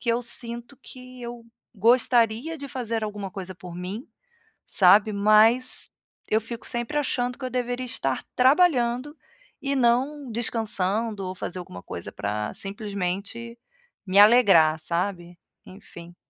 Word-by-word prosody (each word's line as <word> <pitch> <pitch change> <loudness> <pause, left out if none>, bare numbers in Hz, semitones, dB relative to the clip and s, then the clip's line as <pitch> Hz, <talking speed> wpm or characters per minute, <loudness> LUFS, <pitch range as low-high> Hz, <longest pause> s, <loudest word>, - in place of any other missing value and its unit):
que 240 - -6
eu 235 - 0
sinto 240 +2 0
que 255 0 -12
eu 235 0 -8 0.3
gostaria 240 +6 +2
de 280 - -7
fazer 230 -5 -3
alguma 205 -2 -5
coisa 185 -1 -7
por 180 0 -11
mim, 185 +7 -6 0.6
sabe, 200 +3 +5
mas 215 +5 +3 0.4
eu 220 - +2
fico 230 +1 -6
sempre 240 +5 -3
achando 250 -3 -1
que 270 - -7
eu 255 - -3
deveria 245 0 -2
estar 135 - -2
trabalhando 260 -1 +3 0.5
e 280 0 -1
não 260 +3 +1
descansando, 220 -2 -1
ou 185 - -5
fazer 185 0 -5
alguma 90 - -10
coisa 85 - -7
pra 105 +1 -3
simplesmente 200 +3 -4 0.5
me 190 +1 +2
alegrar, 200 -8 +6
sabe. 175 +1 -3 0.3
Enfim. 175 -3 -13
225 Hz, 135 wpm, -25 LUFS, 190-245 Hz, 0.6 s, alegrar